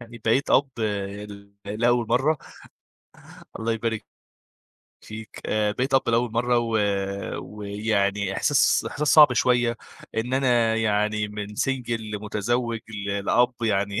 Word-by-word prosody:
يعني 115 -1 -11
بقيت 120 +5 +2
أب 140 +1 +4 0.6
ل 100 0 -12 0.2
لأول 120 +3 +1
مَرّة 135 +5 +2 1.2
الله 115 +1 -1
يبارك 115 -1 -2 1.0
فيك، 110 0 -10
آآ، 105 -1 +1
بقيت 130 +5 -1
أب 135 - +3
لأول 120 0 +1
مَرّة 120 +1 +2
و 115 -1 -1 0.7
ويعني 100 -1 -1
إحساس 145 -2 +3
إحساس 150 0 -2
صعب 150 -4 +8
شوية 120 -2 +2 0.4
إن 115 +3 -2
أنا 120 -4 +2
يعني 105 -1 0
من 105 0 -5
single 125 -4 -1
لمتزوج 110 +2 -2
ل 100 -2 -4
لأب 125 +3 +3
يعني 100 -1 0
115 Hz, 125 wpm, -24 LUFS, 105-120 Hz, 1.2 s, صعب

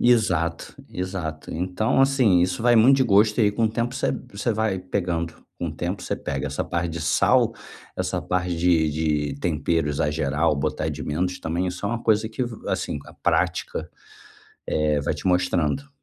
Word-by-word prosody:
Exato, 90 -9 +2
exato. 90 -4 -5
Então, 95 +9 0
assim, 130 -9 +4
isso 90 +4 0
vai 120 -1 +5
muito 125 +5 +7
de - - +4
gosto 105 -1 +4
e - - +5
aí 105 - +3
com 115 +2 0
o - - +4
tempo 120 +2 -1
você - - 0 0.2
você 105 +4 -1
vai 110 -3 0
pegando, 90 -3 -2 0.2
com 85 - -2
o - - -5
tempo, 90 +4 -3
você - - -2
pega 70 -1 -4
essa 70 +1 -2
parte 85 0 -2
de 85 0 -5
sal, 75 - +3 0.4
essa - - -2
parte 90 -1 -1
de 85 -2 +3 0.4
de 70 - -13
tempero, 80 -1 0
exagerar 75 +2 0
ou 75 - +2
botar 70 - -1
de - - -5
menos 90 +4 -2
também, 85 +3 -1
isso 90 +2 -5
é - - +1
uma 115 +1 -3
coisa 110 0 +2
que, 125 +3 -2 0.2
assim - - -2
a - - -12
prática, - - -1 0.8
eh, 75 -1 +1
vai 70 - -1
te 75 - -9
mostrando. 90 - +1
90 Hz, 185 wpm, -24 LUFS, 80-110 Hz, 0.8 s, muito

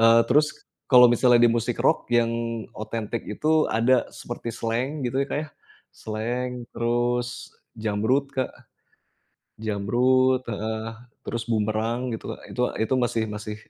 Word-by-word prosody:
eee, 115 0 +7
terus 150 +4 +5 0.4
kalau 125 -1 +9
misalnya 120 0 +5
di - - +4
musik 115 +1 -1
rock - - +2
yang 120 -1 +3 0.4
otentik 110 +1 -4
itu 155 +8 +2
ada 120 +3 +3
seperti 120 -1 -6
Slank 125 +5 -2
gitu 130 +3 0
ya - - -3
Kak - - -1
ya, 155 - -8 0.5
Slank 120 +4 -3 0.2
terus 120 +1 0 0.5
Jamrud 110 +6 +1
Kak, 130 -1 -1 1.1
Jamrud 125 +5 +2
heeh, 110 +1 -3 0.4
terus 115 0 -3
Boomerang 115 +3 0
gitu, - - -6 0.3
itu 125 - -3 0.2
itu 130 - -1
masih 115 -2 0
masih 105 0 -6
120 Hz, 130 wpm, -25 LUFS, 110-125 Hz, 1.1 s, kalau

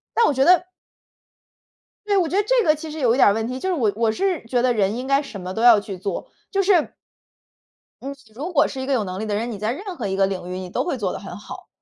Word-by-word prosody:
但 465 - +5
我 290 - +2
觉 265 +1 +2
得 360 +2 +5 1.4
对， 405 -1 +2
我 350 -3 +2
觉 360 - -3
得 410 - +3
这 - - +2
个 305 - +4
其 310 +1 -8
实 315 - -6
有 240 -4 +3
一 - - -2
点 - - +6
儿 200 - +5
问 225 +1 -2
题。 255 +1 -4
就 380 - -2
是 370 - +1
我 230 -10 +1
我 225 -1 +1
是 370 - -1
觉 245 +1 0
得 250 -1 +2
人 205 0 +1
应 255 +2 -5
该 275 +1 +3
什 225 -8 -8
么 185 +1 -5
都 225 - -3
要 235 -3 +7
去 200 -2 -7
做， 190 0 -5 0.2
就 395 -1 +2
是 370 -4 +2 1.1
嗯， 275 +2 -5
你 - - -8 0.2
如 315 +8 -5
果 315 - +4
是 265 - -6
一 - - -3
个 275 - 0
有 230 -5 +1
能 185 0 -5
力 220 - -3
的 210 -1 -2
人， 230 +3 -2
你 210 - -5
在 215 +3 -1
任 375 +6 -6
何 225 -8 -4
一 190 - -2
个 195 - +3
领 185 -2 -4
域 185 - -4
你 185 -1 -6
都 - - -1
会 345 -6 -2
做 200 -6 -2
得 - - -5
很 195 -2 -8
好。 210 - -10
245 Hz, 320 characters per minute, -22 LUFS, 205-315 Hz, 1.4 s, 要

